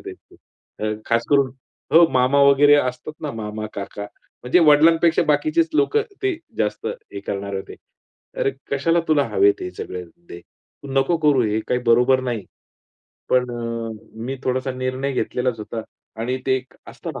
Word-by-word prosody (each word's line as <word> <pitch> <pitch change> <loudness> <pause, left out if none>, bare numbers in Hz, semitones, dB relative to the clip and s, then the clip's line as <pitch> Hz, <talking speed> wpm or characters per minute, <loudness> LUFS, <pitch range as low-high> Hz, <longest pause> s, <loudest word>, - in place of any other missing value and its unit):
त्यांचे. 110 0 -8
खास 115 0 +1
करून 140 -2 +4 0.4
हो, 165 +1 +8
मामा 130 +2 +3
वगैरे 140 +1 +6
असतात 130 +1 -1
ना, 150 - -2
मामा, 110 -1 -5
काका. 100 +1 -6 0.4
म्हणजे 125 +8 +3
वडिलांपेक्षा 160 +2 +5
बाकीचेच 310 - +2
लोकं 430 +5 +2 0.2
ते 390 -3 0 0.2
जास्त 105 0 -1 0.3
हे 100 - -6
करणार 100 0 -3
होते. 95 - -7 0.6
"अरे, - - +2 0.2
कशाला 165 +5 +2
तुला 145 -3 +3
हवेत 400 -1 +3
हे 365 - -4
सगळे 90 - -6
धंदे? 130 - -13
तू 140 - -18
नको 135 +6 +2
करू, 145 -5 +3
हे 110 0 0
काही 125 - +1
बरोबर 125 +3 +4
नाही." 110 -5 -4 0.8
पण 125 -1 +2
अ, 115 -1 -4 0.4
मी 135 +2 -3
थोडासा 130 +1 -1
निर्णय 130 +2 -2
घेतलेलाच 125 -1 -1
होता. 110 +1 -5 0.4
आणि 125 +3 -1
ते 130 - +3
एक 130 0 -9
असतं - - -7
ना, - - -6
130 Hz, 155 wpm, -21 LUFS, 115-150 Hz, 0.8 s, हो